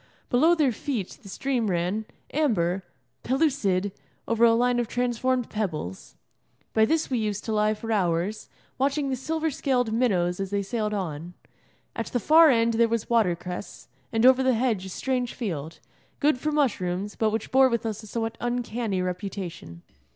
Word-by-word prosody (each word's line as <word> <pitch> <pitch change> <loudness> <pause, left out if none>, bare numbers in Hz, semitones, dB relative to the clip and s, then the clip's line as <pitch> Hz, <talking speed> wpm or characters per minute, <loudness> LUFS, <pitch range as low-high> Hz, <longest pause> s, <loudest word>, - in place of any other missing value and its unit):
Below 310 +7 +5
their 295 -6 +3
feet 230 -4 -4
the 200 - -12
stream 245 +1 -1
ran, 180 +5 -1 0.3
amber, 195 - +1 0.4
pellucid, 245 - +1 0.4
over 230 0 +1
a 230 -1 +6
line 245 +1 +2
of 240 - -1
transformed 245 +1 0
pebbles. 155 - -4 0.6
By 220 0 +5
this 315 +2 0
we 250 - +1
used 210 -2 -2
to 220 - -2
lie 215 0 +2
for 225 +2 -6
hours, 185 0 0 0.3
watching 275 +1 +1
the - - +1
silver 320 +4 -2
scaled 250 -4 0
minnows 185 -7 +1
as 195 -1 -2
they 200 0 -1
sailed 210 +1 -2
on. 170 -2 -5 0.6
At 230 - -3
the 245 - -1
far 315 +6 +7
end 230 -2 +3
there 230 +1 +4
was 230 0 -2
watercress, 180 -5 -1 0.2
and 225 +1 +2
over 260 0 +7
the 260 -2 +3
hedge 220 -6 0
a - - -8
strange 250 +4 -2
field, 165 - -4 0.4
good 290 -3 +2
for 305 +3 -1
mushrooms, 205 -9 0
but 220 - +1
which 220 0 -3
bore 265 0 +6
with 235 -2 -1
us 220 -1 -3
a 215 - -12
somewhat 225 +1 -3
uncanny 240 -5 -1
reputation. 180 - -5
225 Hz, 170 wpm, -26 LUFS, 195-255 Hz, 0.6 s, far